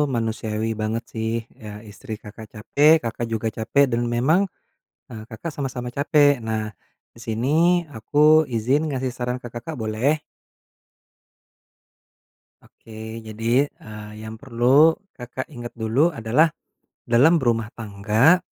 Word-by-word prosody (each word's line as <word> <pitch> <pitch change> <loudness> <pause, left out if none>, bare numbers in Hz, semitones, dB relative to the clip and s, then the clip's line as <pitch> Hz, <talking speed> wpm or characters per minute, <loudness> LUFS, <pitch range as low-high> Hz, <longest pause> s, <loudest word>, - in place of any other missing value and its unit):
manusiawi 110 -1 -2
banget 110 +2 -2
sih. 110 0 -2 0.3
Eee, 105 -1 -9
istri 110 +2 -7
Kakak 110 +1 -10
capek, 145 +8 +3
Kakak 115 0 -3
juga 110 0 -1
capek, 130 +5 +3
dan 115 0 0
memang, 155 +10 +3 0.7
eee, 110 -2 -8
Kakak 120 +8 -6
sama-sama 125 -3 -4
capek. 145 0 +3
Nah, 110 -1 -2 0.4
di - - -17
sini 115 +3 -2 0.4
aku 150 +6 +4
izin 130 +7 +2
ngasih 130 -2 -2
saran 125 0 -3
ke - - -5
Kakak, 155 +7 -6
boleh? 125 +6 0 2.4
Oke. 110 0 -10
Jadi, 115 +5 +1
eee, 105 -6 -11
yang 110 0 -8
perlu 135 +6 +4 0.2
Kakak 125 +1 -6
ingat 120 -5 -8
dulu 120 +9 +1
adalah, 125 +7 +3 0.6
dalam 140 +9 +5
berumah 115 -4 0
tangga 110 - +3
120 Hz, 125 wpm, -23 LUFS, 110-140 Hz, 2.4 s, dalam